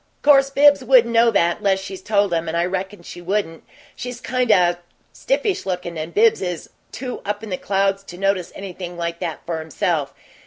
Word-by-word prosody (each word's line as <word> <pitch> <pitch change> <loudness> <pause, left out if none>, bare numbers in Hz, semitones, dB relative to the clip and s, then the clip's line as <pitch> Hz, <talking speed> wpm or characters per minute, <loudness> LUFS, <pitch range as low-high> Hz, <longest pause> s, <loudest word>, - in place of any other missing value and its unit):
'Course 275 -2 +6
Bibbs 285 0 +5
wouldn't 240 -2 +4
know 230 +1 +5
that 175 -6 +2
unless 195 -1 +1
she's 190 -1 -8
told 200 -2 +1
him, 165 0 -1
and 160 +1 -2
I 170 - +2
reckon 190 +1 -4
she 175 - -10
wouldn't; 175 -3 -2 0.3
she's 245 -1 -6
kind 250 -1 0
o' 175 -3 +4 0.4
stiffish 460 -6 -1
lookin', 180 -2 -4
and 160 +1 -5
Bibbs 225 +4 +3
is 180 -3 -4 0.2
too 255 -2 -6
up 205 +1 -3
in 215 - -7
the - - 0
clouds 195 0 0
to 175 - -10
notice 195 -2 0
anything 180 -2 -7
like 170 0 -3
that 165 -4 -5
for 165 -2 -3
himself. 160 -2 -1
195 Hz, 195 wpm, -21 LUFS, 175-230 Hz, 0.4 s, Course